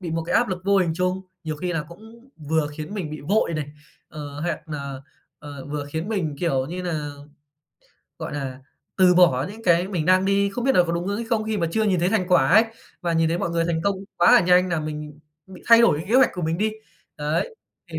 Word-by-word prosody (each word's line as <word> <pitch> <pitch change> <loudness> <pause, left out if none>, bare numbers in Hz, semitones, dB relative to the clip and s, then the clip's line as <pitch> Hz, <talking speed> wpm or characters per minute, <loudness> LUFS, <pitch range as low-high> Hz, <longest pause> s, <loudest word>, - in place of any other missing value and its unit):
bị 175 -3 -5
một 165 0 -1
cái - - -1
áp - - +3
lực 185 0 -4
vô 200 0 +3
hình 170 -3 +1
chung, 180 +1 -1 0.2
nhiều 155 -1 -3
khi 175 +4 -3
là 165 -3 -1
cũng 225 +8 -15
vừa 155 0 -1
khiến 155 +7 -6
mình 175 -7 -4
bị 155 - -7
vội 175 +2 +1
này, 150 -2 -4 0.4
ờ, 145 -2 -8
hoặc 165 -1 -4
nà, 140 -3 -6 0.4
ờ, 145 -2 -9
vừa 145 0 -4
khiến 160 +6 -4
mình, 170 -9 -2
kiểu 135 -6 0
như 180 +4 -5
nà, 155 -5 -3 1.1
gọi - - -5
là, 135 -2 -5 0.4
từ 185 -1 +5
bỏ 150 -7 +4
những 220 +2 -11
cái 175 -1 +3
mình 175 -6 -2
đang 185 +1 +4
đi, 200 0 +2
không 240 +4 -4
biết 270 - +3
nà 180 - +6
có 170 - -2
đúng 170 +1 -2
hướng 200 +1 -1
hay 235 - -4
không, 220 -2 0
khi 220 -1 -2
mà 170 - 0
chưa 220 +6 0
nhìn 190 -5 +1
thấy 175 - +2
thành 195 -4 +1
quả 155 -8 +4
ấy. 220 +7 +6 0.4
Và 170 -1 -1
nhìn 165 0 +2
thấy 170 +2 -1
mọi 170 - -2
người 170 0 0
thành 165 -1 -1
công 200 +1 +1 0.2
quá 175 - +5
nà 175 - -2
nhanh 180 0 +5
làm 165 -3 -1
mình 150 -1 -6 0.3
bị 190 -2 -13
thay 230 0 +8
đổi 230 -10 +4
cái 160 - -6
kế 225 - 0
hoạch 260 0 +6
của 180 - -5
mình 165 +1 -1
đi. 215 +1 0 0.4
Đấy, 155 - -2 0.4
thì - - -3
170 Hz, 255 wpm, -23 LUFS, 155-195 Hz, 1.1 s, thay